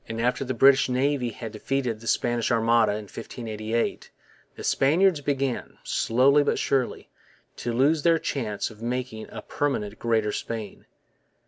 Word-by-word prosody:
After 120 +4 0
the 130 -1 -3
English 135 +2 +5
Navy 130 0 +1
had 115 0 -7
defeated 120 +1 -2
the 115 - -11
Spanish 120 -1 +1
Armada 115 -2 +3
in 105 +1 -4
1588 110 +1 -4 0.5
the - - -9
Spaniards 160 +4 +3
began, 135 -3 -2
slowly 135 +5 +3
but 145 - +1
surely, 130 -3 -1 0.5
to 120 - -3
lose 140 +6 +3
their 165 +1 +4
chance 115 -9 -3
of 110 0 -15
making 120 -2 -4
a - - -8
permanent 110 -8 -2
Greater 110 -2 +1
Spain. 110 -3 -6
120 Hz, 140 wpm, -25 LUFS, 110-135 Hz, 0.5 s, English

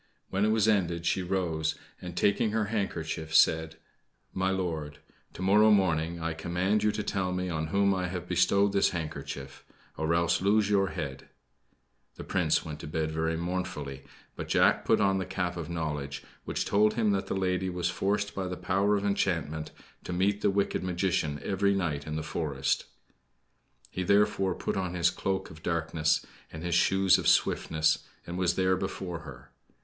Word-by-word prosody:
When 100 +2 +2
it - - +2
was 110 -1 +3
ended 85 -5 +1
she 95 - +1
rose, 85 -4 -1 0.3
and, 90 -1 -8
taking 100 +2 +2
her 110 -1 +1
handkerchief, 80 -6 -3
said: 80 0 +4 0.6
"My 95 0 0
lord; 80 -6 -3 0.4
to 95 - -6
morrow 105 +3 +5
morning 85 -5 +2
I 80 0 -2
command 90 +6 0
you 105 0 +3
to 105 0 -2
tell 95 -3 -1
me 90 0 -2
on 80 -2 -2
whom 100 +4 +2
I 90 -1 -1
have 90 0 -5
bestowed 100 +3 +3
this 100 - +4
handkerchief 75 -5 -6 0.3
or 80 +1 0
else 85 0 +2
lose 105 +1 +3
your 95 -1 +3
head." 70 -8 -6 0.9
The - - -8
Prince - - +1
went 75 -2 -6
to - - -7
bed 80 0 -2
very 80 +1 -1
mournfully; 80 -6 -4 0.3
but - - -6
Jack - - +3
put - - +3
on 95 -1 +2
the 95 - -2
cap 90 -2 -2
of 85 -2 -5
knowledge, 75 -4 -4 0.2
which - - -2
told 105 +1 +3
him 110 -2 +2
that 95 -1 -1
the - - -2
lady 95 0 0
was 90 -1 -1
forced 100 +3 -1
by 95 -1 -3
the 90 0 -4
power 100 +2 +1
of 100 - -3
enchantment 85 -6 -1 0.4
to - - -5
meet 100 +3 +1
the - - +3
wicked 100 -1 0
magician 90 -4 0
every 100 0 +1
night 75 -6 -2
in 75 - -3
the 80 - -2
forest. 70 -4 -1 1.1
He, 95 - -3
therefore, 100 -1 +2
put - - -3
on 90 -2 -2
his 85 0 +3
coat 95 0 -2
of 80 0 -13
darkness, 80 -2 0 0.3
and 80 +1 -8
his 90 -1 -1
shoes 95 +2 +4
of - - -2
swiftness, 80 -1 +2 0.2
and 85 - -6
was 90 -1 +1
there 95 0 +2
before 95 -2 -4
her. 70 -7 -12
90 Hz, 180 wpm, -29 LUFS, 80-95 Hz, 1.1 s, morrow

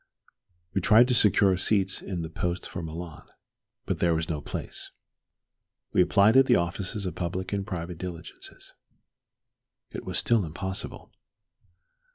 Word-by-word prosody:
We 95 - 0
tried 110 +6 +6
to - - +3
secure 100 -4 +4
seats 100 0 +2
in 90 -3 -4
the 80 - -5
post 90 +2 -2
for 90 - -6
Milan. 80 -1 -8 0.6
There 85 -2 +1
was 80 +2 -2
no 75 -3 -2
place. - - -6 1.0
We - - +5
applied 100 +4 +4
at 135 0 +6
the - - +5
offices 95 +4 -2
of 90 - -3
public 90 +3 -4
and 100 0 -2
private 85 -3 -5
diligences. 85 -2 -9 1.2
It - - -6
was - - -3
still 115 -4 +3
impossible. 95 +4 -5
90 Hz, 140 wpm, -27 LUFS, 85-100 Hz, 1.2 s, tried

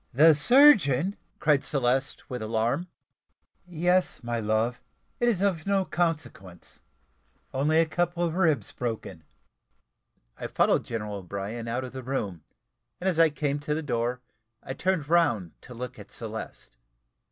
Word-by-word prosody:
"The 155 +4 +7
surgeon!" 195 - +5 0.2
cried 150 -2 +3
Celeste 135 0 0
with 125 -3 -5
alarm. 115 +9 -1 0.8
"Yes, 180 0 0
my 120 0 -2
love; 110 +3 0 0.4
it 240 - +3
is 200 -5 0
of 185 -4 0
no 195 -1 +2
consequence 130 - -4 0.7
only 150 +4 +2
a 165 - +5
couple 175 +1 -1
of 165 -2 0
ribs 160 - +1
broken." 110 -8 -5 1.2
I - - -4
followed - - +2
General 105 -3 -4
O'Brien 100 +5 -5
out 120 +3 -2
of 130 - -8
the 130 - -6
room, 110 - -4 0.6
and 185 - -3
as 175 -3 +1
I 165 -1 +6
came 145 -1 -2
to 150 +1 -2
the 160 - -3
door, 120 -2 -1 0.4
I 130 - -5
turned 165 0 -1
round 120 - +2
to 125 - -11
look 125 0 -7
at 105 - -12
Celeste. 110 - -7
135 Hz, 145 wpm, -27 LUFS, 115-165 Hz, 1.2 s, The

